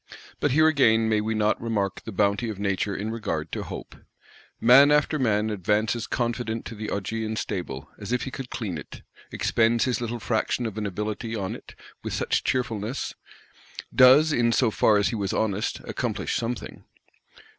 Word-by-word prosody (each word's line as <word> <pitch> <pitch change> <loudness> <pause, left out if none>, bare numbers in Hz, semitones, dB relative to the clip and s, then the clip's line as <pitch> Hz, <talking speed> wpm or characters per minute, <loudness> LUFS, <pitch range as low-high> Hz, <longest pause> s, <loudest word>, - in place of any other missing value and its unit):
But 145 - +1
here 155 +4 +4
again 115 -7 +4
may 110 -1 +2
we 110 +1 -2
not 105 0 +1
remark 105 -4 -1
the 110 - -8
bounty 100 +3 +1
of 105 - -5
Nature 100 0 -1
in 105 +3 -3
regard 115 -1 -3
to - - -3
Hope? - - -8 0.6
Man 130 +5 +7
after 150 +1 +2
man 110 -3 +1
advances 105 +4 0
confident 120 -2 -2
to - - -6
the 110 -1 -5
Augean 110 +2 -3
Stable, 85 -10 -4
as 105 +1 -6
if 125 - 0
he 135 - -5
could 135 -2 -7
clean 95 -10 -4
it; 70 - -11 0.3
expends 115 0 +2
his 125 -2 -1
little 120 0 -3
fraction 115 +2 -1
of 110 - -4
an 105 - -2
ability 105 +3 -4
on 95 -3 -3
it, - - -13 0.3
with - - -4
such - - 0
cheerfulness; 120 -1 -2 0.8
does, 145 +5 +7
in 120 -2 +2
so 115 -1 +2
far 105 0 +4
as 100 - +2
he 120 - -3
was 100 -3 -2
honest, 105 -1 -1
accomplish - - -3
something. 120 +1 -4
110 Hz, 175 wpm, -25 LUFS, 105-120 Hz, 0.8 s, Man